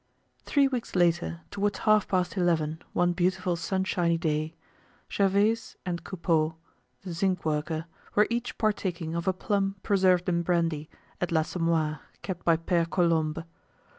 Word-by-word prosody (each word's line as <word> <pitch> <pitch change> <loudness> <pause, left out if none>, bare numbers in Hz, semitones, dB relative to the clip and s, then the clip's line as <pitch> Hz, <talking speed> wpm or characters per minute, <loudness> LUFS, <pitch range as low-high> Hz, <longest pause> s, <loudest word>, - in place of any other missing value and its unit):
Three 280 -2 +4
weeks 250 -6 -4
later, 175 -1 +2
towards 205 0 -1
half 215 -1 +3
past 185 0 0
eleven, 160 -4 +1
one 175 0 +2
beautiful 180 0 0
sunshiny 175 -1 0
day, 155 -1 -1 0.6
Gervaise 205 +3 +1
and 170 -2 -3
Coupeau, 165 -4 0 0.5
the 180 -3 -5
zinc 185 +1 0
worker, 155 +1 -1 0.3
were 210 - +6
each 240 +1 -2
partaking 185 -6 -1
of 170 +2 -3
a 190 - +3
plum 195 +1 0
preserved 185 -3 +3
in 170 -1 +2
brandy, 165 -3 0 0.3
at 175 - -1
"l'Assommoir" 160 -2 +1 0.2
kept 185 -3 -5
by 165 -1 +4
Pere 165 0 +1
Colombe. 165 -3 +1
175 Hz, 135 wpm, -28 LUFS, 165-190 Hz, 0.6 s, were